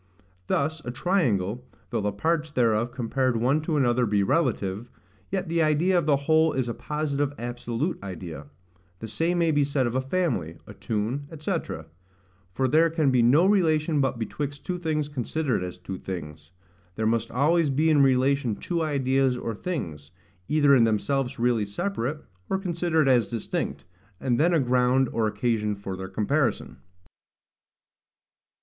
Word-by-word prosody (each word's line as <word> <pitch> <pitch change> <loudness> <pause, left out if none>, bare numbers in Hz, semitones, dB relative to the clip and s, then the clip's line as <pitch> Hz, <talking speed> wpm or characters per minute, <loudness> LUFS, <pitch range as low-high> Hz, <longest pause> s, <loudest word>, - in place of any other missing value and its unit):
Thus 155 +2 -1
a - - -5
triangle, 125 - 0 0.3
though - - 0
the 105 0 0
parts 160 +9 0
thereof 120 -4 +1
compared 130 0 0
one 130 +7 +2
to 155 -1 -1
another 125 -3 +2
be 100 -1 +2
relative, 110 - 0 0.4
yet 190 -1 -2
the 165 0 +1
idea 160 +4 +2
of 170 -3 +2
the 145 - +5
whole 160 0 +4
is 130 -2 -1
a 120 - -2
positive 145 -1 -2
absolute 120 +6 -3
idea. 85 -6 -7 0.5
The 110 - -7
same 165 +10 0
may 165 -2 +2
be 145 -1 +3
said 140 -2 0
of 120 - -2
a 130 - +1
family, 130 - -1
a - - -11
tune, 115 +6 -3
&c. 170 +6 -1 1.0
for 130 +8 0
there 160 +5 +4
can 155 -4 +1
be 125 -2 +3
no 135 +9 +5
relation 160 -6 +2
but 135 -2 0
betwixt 145 +5 -5
two 180 -1 -3
things 155 -3 -1
considered 145 -3 -2
as 90 0 -6
two 90 +1 -7
things. 75 -4 -7 0.5
There 110 - -2
must 115 +1 +1
always 150 +5 +2
be 155 +4 +2
in 150 -2 +5
relation 130 -3 +2
two 170 - -3
ideas 135 -4 +1
or 115 -2 -4
things, 85 - -5 0.4
either 145 -2 +4
in 120 - +5
themselves 125 +4 0
really 115 -3 +1
separate, 150 - -3 0.2
or 190 - +1
considered 170 -5 0
as 125 -3 +4
distinct, 115 -2 -4 0.3
and 120 -3 0
then 170 +4 +4
a 170 - +3
ground 125 0 +2
or 115 -1 +1
occasion 105 -2 -1
for 100 -1 -6
their 95 0 -7
comparison. 120 +8 -1
130 Hz, 160 wpm, -26 LUFS, 115-155 Hz, 1.0 s, the